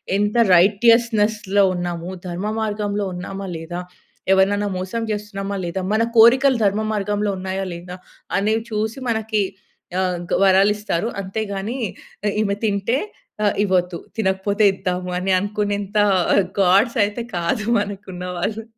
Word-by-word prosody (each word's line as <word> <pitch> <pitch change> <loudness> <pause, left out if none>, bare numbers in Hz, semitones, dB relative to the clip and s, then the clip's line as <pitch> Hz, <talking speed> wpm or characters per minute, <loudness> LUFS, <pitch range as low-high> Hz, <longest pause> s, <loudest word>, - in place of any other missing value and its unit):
ఎంత 205 +2 0 0.2
రైటియస్‌నెస్‌లో 210 0 +3
ఉన్నాము, 175 0 -4 0.2
ధర్మమార్గంలో 205 +2 -2
ఉన్నామా 195 +2 -6
లేదా, 165 +2 -6 0.5
ఎవరినైనా 200 +2 +3
మోసం 185 +5 -3
చేస్తున్నామా 200 -1 -4
లేదా, 180 +2 -3
మన 220 +1 +3
కోరికలు 260 +3 +6
ధర్మ 205 +2 +2
మార్గంలో 205 0 -1
ఉన్నాయా 190 +1 -3
లేదా, 180 +1 -8 0.4
అనేవి 215 +3 +1
చూసి 220 +4 -2
మనకి 220 -2 0 0.6
ఆహ్, 180 -1 0
గ - - -1
వరాలిస్తారు. 195 0 +3
అంతే 195 +3 -4
గాని 215 +7 -3 0.6
ఈమె 200 -1 0
తింటే 210 +5 0 0.4
ఆ! - - +3 0.2
ఇవ్వొద్దు, 180 -3 +1 0.2
తినకపోతే 200 +1 0
ఇద్దాము 180 -1 -3
అని 190 +1 -1
అనుకునేంత 205 0 -2 0.6
గాడ్స్ 195 +7 +4
అయితే 205 +3 -2
కాదు 175 +6 -1
మనకున్నవాళ్ళు! 195 +1 -4
200 Hz, 115 wpm, -21 LUFS, 190-215 Hz, 0.6 s, కోరికలు